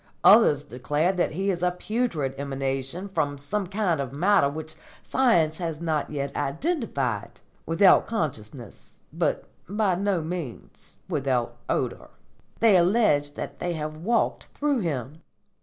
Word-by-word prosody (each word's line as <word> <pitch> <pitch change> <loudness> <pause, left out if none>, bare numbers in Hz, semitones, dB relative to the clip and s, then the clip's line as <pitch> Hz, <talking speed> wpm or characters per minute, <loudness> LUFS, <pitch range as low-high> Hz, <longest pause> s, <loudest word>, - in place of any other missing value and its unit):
Others 195 - +6
declare 145 +6 0
that 180 -4 0
he 195 +4 0
is 175 -2 -3
a 180 - +3
putrid 180 - -2
emanation 135 +5 -3
from 155 -7 -1
some 195 +8 -2
kind 185 -6 0
of 135 -2 -4
matter 160 0 +3
which 155 +2 -6 0.3
science 170 -12 +2
has 165 -4 -4
not 160 -3 -1
yet 140 -2 -4
identified, 235 - -2 0.3
without 175 +4 +5
consciousness, 125 - -5 0.2
but - - 0 0.3
by 205 -1 +1
no 190 -2 0
means 160 -7 -7
without 135 -7 -1
odour. - - -2 0.5
They 220 -4 +6
allege 170 -6 +3
that - - -6
they 175 0 -2
have 155 -1 -4
walked 225 +9 0
through 285 -3 -1
him." 150 - -3
160 Hz, 135 wpm, -26 LUFS, 145-195 Hz, 0.5 s, Others